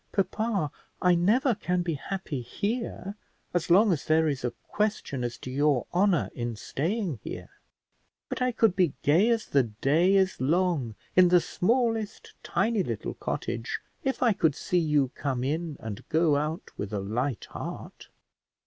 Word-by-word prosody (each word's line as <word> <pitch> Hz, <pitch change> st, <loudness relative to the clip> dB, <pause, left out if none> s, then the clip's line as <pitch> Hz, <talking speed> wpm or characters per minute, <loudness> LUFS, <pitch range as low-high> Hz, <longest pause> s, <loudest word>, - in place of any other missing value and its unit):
Papa, 195 Hz, -4 st, 0 dB, 0.3 s
I 180 Hz, -1 st, +4 dB
never 225 Hz, -, +3 dB
can 180 Hz, -4 st, -1 dB
be 170 Hz, -1 st, -1 dB
happy 155 Hz, -2 st, -4 dB
here, 200 Hz, -, -3 dB, 0.4 s
as 175 Hz, -1 st, 0 dB
long 195 Hz, +3 st, +6 dB
as 150 Hz, -, -3 dB
there 160 Hz, 0 st, +3 dB
is 140 Hz, -4 st, -2 dB
a 125 Hz, -, +1 dB, 0.2 s
question 210 Hz, -, -1 dB
as 120 Hz, 0 st, -3 dB
to 130 Hz, -, -7 dB
your 140 Hz, -1 st, +2 dB
honour 180 Hz, -3 st, +2 dB
in 120 Hz, -1 st, -3 dB
staying 165 Hz, -, -2 dB
here; -, -, -7 dB, 0.8 s
but -, -, -5 dB
I 250 Hz, 0 st, +2 dB
could 225 Hz, -5 st, +3 dB
be 180 Hz, -6 st, +2 dB
gay 170 Hz, +10 st, +4 dB
as 230 Hz, -2 st, +1 dB
the 140 Hz, -, +3 dB
day 140 Hz, -, +2 dB
is 190 Hz, -5 st, +2 dB
long 155 Hz, -, +1 dB, 0.2 s
in 185 Hz, -1 st, +7 dB
the 180 Hz, 0 st, +6 dB
smallest 225 Hz, +3 st, -1 dB
tiny 225 Hz, -2 st, +1 dB
little 115 Hz, -, -3 dB
cottage, 115 Hz, 0 st, -3 dB, 0.2 s
if 265 Hz, -1 st, 0 dB
I 235 Hz, -3 st, +5 dB
could 160 Hz, -7 st, +2 dB
see 180 Hz, +3 st, 0 dB
you 150 Hz, -5 st, +2 dB
come 130 Hz, -3 st, -2 dB
in 155 Hz, +2 st, -2 dB
and 105 Hz, -2 st, -6 dB
go 160 Hz, -2 st, +3 dB
out 155 Hz, +4 st, -2 dB
with 100 Hz, -, -4 dB
a 105 Hz, -, 0 dB
light 115 Hz, +6 st, -2 dB
heart. -, -, -7 dB
170 Hz, 165 wpm, -28 LUFS, 135-200 Hz, 0.8 s, in